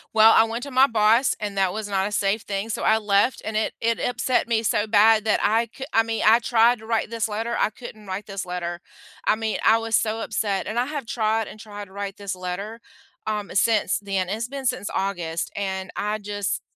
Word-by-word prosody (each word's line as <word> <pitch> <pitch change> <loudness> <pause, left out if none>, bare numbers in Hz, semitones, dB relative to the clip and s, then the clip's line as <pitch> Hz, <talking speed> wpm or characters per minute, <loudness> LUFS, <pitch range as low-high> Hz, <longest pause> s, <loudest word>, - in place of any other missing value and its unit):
Well, 220 0 +8
I 225 - +6
went 230 +2 -4
to 280 - -7
my 260 +1 +5
boss, 225 +2 +3
and 205 -1 -4
that 190 -2 +2
was 215 -1 -5
not 195 0 0
a - - -6
safe 205 0 0
thing, 200 +2 -3
so, - - -3
I 220 - +4
left, 205 +3 +2
and 220 -1 -3
it 220 - 0
it 230 0 +1
upset 245 0 0
me 230 -1 +1
so 210 0 +1
bad 215 +1 +5
that 215 - +2
I 225 +2 +2
c 265 - -7
I 225 - +4
mean, 225 0 -3
I 225 +2 +7
tried 235 0 +3
to 220 - -13
write 225 -1 0
this 230 -1 -1
letter, 225 +2 -3
I - - +3
couldn't 215 -2 -11
write 190 +2 -4
this 195 -2 -5
letter. 175 -1 -4 0.5
I - - +4
mean, 220 -1 -2
I 225 - +5
was 225 0 +1
so 225 +1 -1
upset, 205 -3 -2
and 225 +3 -2
I 245 - +1
have 290 -2 -5
tried 220 -1 0
and 215 - -12
tried 205 -1 -8
to - - -20
write 200 0 -5
this 200 -2 -5
letter, 185 +5 -5 0.5
um, 210 -1 -3
since 215 -2 +2
then 195 -3 -2
it's 220 +4 -2
been 275 +1 -7
since 250 -5 -1
August, 175 -4 -2
and 190 -1 -4
I 210 +1 -1
just 205 -1 -3
215 Hz, 235 wpm, -24 LUFS, 200-225 Hz, 0.5 s, Well